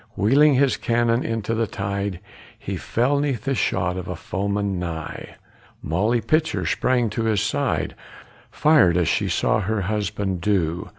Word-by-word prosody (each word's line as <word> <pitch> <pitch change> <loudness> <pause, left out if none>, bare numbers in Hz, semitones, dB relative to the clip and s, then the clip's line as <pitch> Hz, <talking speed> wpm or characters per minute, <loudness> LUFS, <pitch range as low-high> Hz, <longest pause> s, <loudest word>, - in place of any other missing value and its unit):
Wheeling 140 +8 +4
his 135 0 +3
cannon 120 0 +1
into 115 -1 -2
the 115 0 0
tide, 100 -1 -3 0.4
He - - -5
fell 130 +5 0
'neath 135 -6 -1
the 135 +1 0
shot 90 -7 0
of 90 0 -5
a 90 - -4
foeman 100 +2 -2
nigh. 80 -3 -6 0.5
Molly 105 +9 +1
Pitcher 155 +8 0
sprang 125 -2 +1
to 115 +1 -2
his 110 -2 +2
side, 125 +6 -1 0.6
Fired 145 - +4
as 90 -3 +2
she - - +1
saw - - +1
her 105 +1 -1
husband 100 -2 -2
do. 90 -3 0
105 Hz, 155 wpm, -23 LUFS, 95-120 Hz, 0.6 s, Wheeling